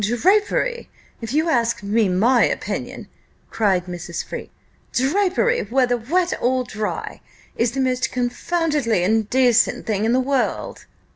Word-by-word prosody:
"Drapery, 405 Hz, -, +1 dB, 0.3 s
if 230 Hz, -1 st, -5 dB
you 310 Hz, +4 st, +1 dB
ask 235 Hz, -8 st, 0 dB
me 210 Hz, 0 st, +1 dB
my 230 Hz, +7 st, +3 dB
opinion," -, -, -3 dB, 0.4 s
cried 190 Hz, -5 st, +1 dB
Mrs. 175 Hz, -1 st, -6 dB
Freke, -, -, -7 dB, 0.4 s
"drapery, 395 Hz, -, +1 dB
whether 250 Hz, -1 st, +2 dB
wet 345 Hz, +10 st, 0 dB
or 255 Hz, +1 st, +1 dB
dry, 215 Hz, -3 st, -5 dB, 0.3 s
is 235 Hz, 0 st, 0 dB
the 270 Hz, -, -1 dB
most 255 Hz, 0 st, 0 dB
confoundedly 250 Hz, -, 0 dB
indecent 240 Hz, +4 st, +2 dB
thing 210 Hz, -2 st, -1 dB
in 225 Hz, -, +2 dB
the 255 Hz, -, +3 dB
world." 260 Hz, 0 st, -2 dB
245 Hz, 130 wpm, -21 LUFS, 220-285 Hz, 0.4 s, my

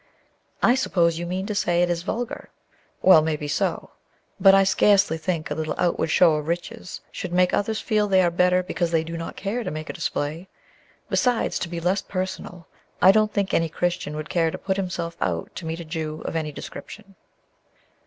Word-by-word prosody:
"I 240 Hz, -, +6 dB
suppose 170 Hz, -10 st, +1 dB
you 175 Hz, -, -4 dB
mean 185 Hz, +2 st, -3 dB
to 210 Hz, -, -3 dB
say 175 Hz, -3 st, +2 dB
it 175 Hz, -, +1 dB
is 170 Hz, -1 st, -1 dB
vulgar; 240 Hz, +6 st, -4 dB, 0.5 s
well, 185 Hz, -4 st, +8 dB
maybe 155 Hz, -1 st, -2 dB
so. 145 Hz, -, -1 dB, 0.5 s
But 195 Hz, 0 st, +7 dB
I 195 Hz, -, +6 dB
scarcely 200 Hz, -2 st, +4 dB
think 165 Hz, -2 st, -3 dB
a -, -, +2 dB
little 155 Hz, 0 st, -3 dB
outward 175 Hz, -, +1 dB
show 160 Hz, -1 st, +4 dB
of 150 Hz, 0 st, -5 dB
riches 180 Hz, +4 st, -4 dB
should 185 Hz, -, -6 dB
make 180 Hz, 0 st, +3 dB
others 215 Hz, +2 st, 0 dB
feel 215 Hz, -2 st, +1 dB
they 190 Hz, -2 st, +4 dB
are 175 Hz, -, +2 dB
better 180 Hz, +1 st, +3 dB
because 175 Hz, -1 st, -2 dB
they 165 Hz, -1 st, +1 dB
do 165 Hz, +1 st, -6 dB
not 165 Hz, 0 st, -6 dB
care 220 Hz, +5 st, -3 dB
to -, -, -3 dB
make 155 Hz, 0 st, -5 dB
a -, -, -12 dB
display. 155 Hz, +6 st, -3 dB, 0.6 s
Besides, 245 Hz, -2 st, +1 dB
to 170 Hz, -, -4 dB
be 170 Hz, 0 st, -4 dB
less 180 Hz, +4 st, +1 dB
personal, 185 Hz, -2 st, -5 dB, 0.3 s
I 185 Hz, -, +8 dB
don't 215 Hz, +1 st, +2 dB
think 200 Hz, -1 st, -1 dB
any 165 Hz, -1 st, +2 dB
Christian 175 Hz, -2 st, -2 dB
would 155 Hz, 0 st, -5 dB
care 165 Hz, -2 st, +1 dB
to -, -, -5 dB
put 190 Hz, 0 st, -2 dB
himself 175 Hz, -3 st, -3 dB
out 85 Hz, -2 st, -2 dB
to 165 Hz, -, -7 dB
meet 165 Hz, +1 st, -4 dB
a -, -, -8 dB
Jew 155 Hz, -1 st, -5 dB
of -, -, -4 dB
any 155 Hz, -2 st, -2 dB
description." 200 Hz, +7 st, -10 dB
175 Hz, 205 wpm, -24 LUFS, 160-195 Hz, 0.6 s, well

